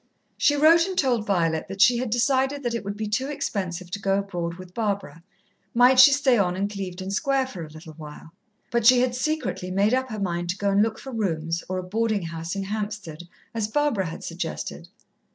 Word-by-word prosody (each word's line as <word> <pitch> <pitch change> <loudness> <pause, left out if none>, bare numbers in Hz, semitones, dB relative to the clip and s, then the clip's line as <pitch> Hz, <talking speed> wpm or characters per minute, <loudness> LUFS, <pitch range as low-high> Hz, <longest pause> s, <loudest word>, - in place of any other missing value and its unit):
She 290 - +3
wrote 330 +4 +5
and 375 -1 -5
told 245 -8 +1
Violet 165 -5 +1
that 195 +1 -8
she 235 +5 +6
had 250 -1 -2
decided 265 +4 +1
that 240 -1 -1
it 235 - -3
would 200 +1 -5
be 215 0 -3
too 240 +6 -1
expensive 185 -11 -4
to 200 - -3
go 195 -1 +1
abroad 175 -4 -3
with 185 0 -12
Barbara. 200 -8 -3 0.5
Might 250 +2 +6
she 260 +3 +10
stay 270 -4 +3
on 180 -2 +1
in 195 +2 -1
Clevedon 190 -2 -6
Square 270 +5 +1
for 190 -10 -7
a 155 - -9
little 155 +1 -12
while? 155 +1 -11 0.4
But 235 -1 +1
she 250 0 +7
had 250 -1 +1
secretly 280 -8 -2
made 200 +5 +2
up 260 0 0
her 215 -2 -5
mind 175 -3 -2
to 180 - -1
go 200 0 0
and 200 +1 +4
look 220 0 0
for 270 - -9
rooms 165 -7 -2
or 185 - -2
a 185 - -3
boarding 215 +1 -1
house 165 +2 -5
in 195 - -2
Hampstead, 200 -5 -5 0.3
as 225 -2 -1
Barbara 230 -7 0
had 165 - -7
suggested. - - -5
205 Hz, 215 wpm, -25 LUFS, 180-250 Hz, 0.5 s, she